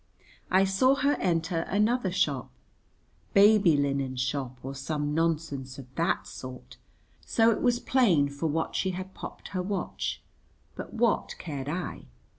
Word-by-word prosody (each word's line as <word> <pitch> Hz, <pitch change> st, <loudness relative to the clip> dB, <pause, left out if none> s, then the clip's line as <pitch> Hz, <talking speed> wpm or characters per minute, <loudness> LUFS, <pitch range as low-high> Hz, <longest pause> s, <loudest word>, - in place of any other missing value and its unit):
I 190 Hz, +1 st, +5 dB
saw 225 Hz, +8 st, +3 dB
her 280 Hz, +1 st, +2 dB
enter 165 Hz, 0 st, 0 dB
another 210 Hz, +1 st, +2 dB
shop, 185 Hz, -, 0 dB, 0.9 s
baby 200 Hz, -5 st, +6 dB
linen 140 Hz, -2 st, 0 dB
shop 130 Hz, 0 st, -2 dB
or 135 Hz, +1 st, -5 dB
some 145 Hz, +2 st, -2 dB
nonsense 150 Hz, -5 st, -1 dB
of 130 Hz, -2 st, -11 dB
that 170 Hz, +3 st, 0 dB
sort, 130 Hz, 0 st, -9 dB, 0.5 s
so 225 Hz, 0 st, +3 dB
it -, -, -1 dB
was 245 Hz, -1 st, +2 dB
plain 195 Hz, -, +3 dB
for 140 Hz, +3 st, -3 dB
what 160 Hz, +2 st, -1 dB
she 190 Hz, -, +1 dB
had 190 Hz, 0 st, -7 dB
popped -, -, -9 dB
her 185 Hz, -, -2 dB
watch; 190 Hz, 0 st, -3 dB, 0.5 s
but -, -, -7 dB
what 230 Hz, -1 st, +1 dB
cared 145 Hz, -4 st, -5 dB
I? 170 Hz, -, -4 dB
165 Hz, 145 wpm, -28 LUFS, 140-200 Hz, 0.9 s, baby